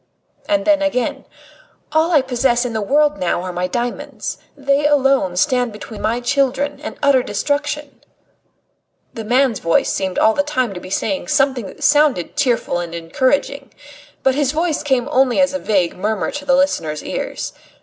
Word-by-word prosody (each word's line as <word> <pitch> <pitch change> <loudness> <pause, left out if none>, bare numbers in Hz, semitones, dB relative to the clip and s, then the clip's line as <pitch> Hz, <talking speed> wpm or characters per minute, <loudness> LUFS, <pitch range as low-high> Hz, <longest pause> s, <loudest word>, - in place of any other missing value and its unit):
And 300 -1 +1
then 305 -1 +3
again: 270 -4 -1 0.7
"All 315 +2 +2
I 295 -5 +4
possess 250 -1 +1
in 240 - -3
the 220 - -1
world 295 +7 +2
now 175 0 -1
are 185 -1 -5
my 180 +1 -1
diamonds. 240 +5 -4 0.2
They 280 +1 +2
alone 270 -10 +2
stand 250 0 +1
between 210 0 -9
my 225 +3 0
children 275 +2 0
and 305 - -7
utter 280 -2 +5
destitution." 290 +6 -3 1.1
The 225 - -6
man's 245 0 +2
voice 165 0 +1
seemed 190 -1 -2
all 220 - +4
the 285 - +1
time 255 -7 -1
to 180 - -6
be 185 - -10
saying 280 +9 -2
something 270 -7 +1
that - - -10
sounded 290 - +3
cheerful 245 -9 0
and 170 -1 -5
encouraging. 255 - -1 0.5
But 265 - +3
his 285 0 0
voice 320 0 0
came 265 -4 0
only 260 -1 +3
as 280 0 +3
a 280 - -2
vague 190 -8 0
murmur 210 +2 -2
to 290 0 -6
the 270 -1 +3
listener's 165 - 0
ears. - - -4
260 Hz, 170 wpm, -19 LUFS, 215-285 Hz, 1.1 s, utter